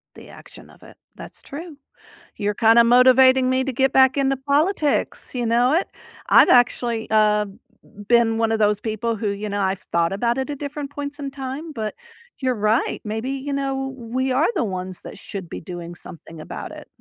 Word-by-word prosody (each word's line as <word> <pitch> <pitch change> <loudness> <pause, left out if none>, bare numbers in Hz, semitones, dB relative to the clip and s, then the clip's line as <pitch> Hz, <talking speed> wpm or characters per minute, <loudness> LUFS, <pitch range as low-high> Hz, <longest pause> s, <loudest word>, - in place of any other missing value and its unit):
The - - -13
action - - -14
of - - -20
it. - - -16 0.2
That's - - -9
true. 310 +1 -9 0.6
You're 205 -1 -1
kinda 230 +2 +5
motivating 255 +2 +5
me 260 0 +1
to 270 0 -3
get 265 +2 +2
back 265 0 +4
into 270 -1 +1
politics. 290 +2 0
You 245 -1 -1
know 240 +4 +2
it? 345 +4 +1 0.4
I've - - +7
actually, 240 -2 +2
uh, 210 -1 +3 0.6
been 235 -1 +3
one 225 0 +1
of 225 - 0
those 210 -1 +2
people 225 +1 -3
who, 210 - -3
you 200 +1 -4
know, 205 0 -2
I've 190 -1 -1
thought 170 +1 -1
about 235 +4 0
it 265 +2 -3
at 290 - -4
different 285 0 -5
points 290 0 -6
in 280 -1 -5
time, 275 +4 -6
but 215 -4 -4 0.5
you're 260 -3 0
right. 215 +3 0
Maybe, 220 +4 -4
you 275 +1 -4
know, 270 -1 -2
we 255 +2 -2
are 275 +6 +2
the - - +1
ones 185 -3 -5
that - - -10
should 190 -4 -8
be - - -6
doing 175 0 -8
something 165 -1 -11
about 155 - -8
it. - - -11
245 Hz, 195 wpm, -22 LUFS, 215-270 Hz, 0.6 s, I've